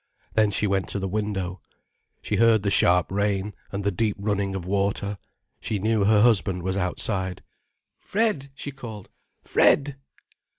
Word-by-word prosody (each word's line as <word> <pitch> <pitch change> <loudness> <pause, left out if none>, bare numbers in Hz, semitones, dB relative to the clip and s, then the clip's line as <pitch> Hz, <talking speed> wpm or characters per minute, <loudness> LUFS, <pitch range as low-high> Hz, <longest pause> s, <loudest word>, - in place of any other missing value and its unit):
Then 110 -1 +3
she 105 - 0
went 95 -3 0
to - - -2
the 95 - -2
window. 95 -2 -3 0.6
She - - -1
heard 115 -3 +4
the 100 - 0
sharp 90 -1 +4
rain, 100 0 -1 0.2
and 100 0 -4
the 100 - +1
deep 105 +2 -1
running 100 -1 -1
of 90 -3 -5
water. 100 +1 -1 0.4
She 110 - -2
knew 110 0 +1
her 105 0 +5
husband 95 -6 +2
was 95 +1 -1
outside. 95 0 -1 0.6
"Fred," 205 -11 -1
she 145 - -6
called, 115 -7 -9 0.3
"Fred!" 140 -1 +3
100 Hz, 155 wpm, -25 LUFS, 95-110 Hz, 0.6 s, her